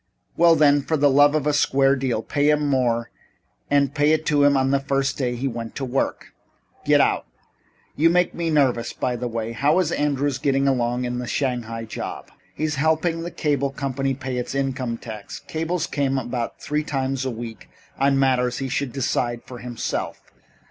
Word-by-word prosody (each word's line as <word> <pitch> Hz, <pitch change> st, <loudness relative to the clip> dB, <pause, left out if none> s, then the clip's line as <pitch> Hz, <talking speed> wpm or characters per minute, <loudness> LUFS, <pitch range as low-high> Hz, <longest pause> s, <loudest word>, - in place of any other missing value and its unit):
"Well 170 Hz, -1 st, +6 dB
then, 145 Hz, -2 st, +4 dB
for 160 Hz, +3 st, -1 dB
the 145 Hz, -1 st, +4 dB
love 145 Hz, +2 st, +5 dB
of 150 Hz, -2 st, 0 dB
a 150 Hz, -, +2 dB
square 135 Hz, -1 st, +3 dB
deal, 130 Hz, -4 st, -1 dB
pay 145 Hz, 0 st, +1 dB
him 150 Hz, -1 st, +2 dB
more 120 Hz, -4 st, +1 dB, 0.6 s
and 140 Hz, -1 st, +2 dB
pay 150 Hz, +1 st, +3 dB
it 155 Hz, 0 st, 0 dB
to 145 Hz, -2 st, +3 dB
him 145 Hz, 0 st, +5 dB
from 135 Hz, -1 st, +2 dB
the 140 Hz, -, +3 dB
first 135 Hz, -1 st, 0 dB
day 125 Hz, -3 st, -1 dB
he 130 Hz, +3 st, -2 dB
went 115 Hz, -2 st, -5 dB
to 135 Hz, -, -3 dB
work. 130 Hz, +2 st, -2 dB, 0.5 s
Get -, -, +5 dB
out. -, -, +2 dB, 0.7 s
You 165 Hz, +3 st, +4 dB
make 180 Hz, +1 st, +2 dB
me 170 Hz, -1 st, -2 dB
nervous. 130 Hz, -6 st, +1 dB
By 125 Hz, -, -2 dB
the 120 Hz, +1 st, -3 dB
way, 115 Hz, -1 st, -3 dB
how 140 Hz, +8 st, +2 dB
is 180 Hz, -3 st, +1 dB
Andrews 145 Hz, -3 st, 0 dB
getting 135 Hz, -1 st, +1 dB
along 125 Hz, -1 st, 0 dB
in 125 Hz, 0 st, -3 dB
his 125 Hz, -, -5 dB
Shanghai 120 Hz, -4 st, -2 dB
job?" 110 Hz, -, -7 dB, 0.2 s
"He's 155 Hz, -1 st, -2 dB
helping 160 Hz, +1 st, +1 dB
the 170 Hz, -, -4 dB
cable 145 Hz, -4 st, 0 dB
company 135 Hz, -1 st, -2 dB
pay 130 Hz, -1 st, -4 dB
its 125 Hz, +2 st, -4 dB
income 130 Hz, -3 st, -2 dB
tax. 110 Hz, -3 st, -8 dB
Cables 165 Hz, +1 st, -2 dB
about 130 Hz, -4 st, -1 dB
three 150 Hz, +1 st, -2 dB
times 135 Hz, -3 st, -2 dB
a 130 Hz, -, -1 dB
week 115 Hz, -1 st, -8 dB, 0.3 s
on 135 Hz, 0 st, +3 dB
matters 130 Hz, -2 st, +2 dB
he 135 Hz, -1 st, -3 dB
should 135 Hz, 0 st, -2 dB
decide 120 Hz, -3 st, -1 dB
for 125 Hz, -1 st, -9 dB
himself. 120 Hz, -1 st, -4 dB
135 Hz, 190 wpm, -23 LUFS, 125-145 Hz, 0.7 s, Well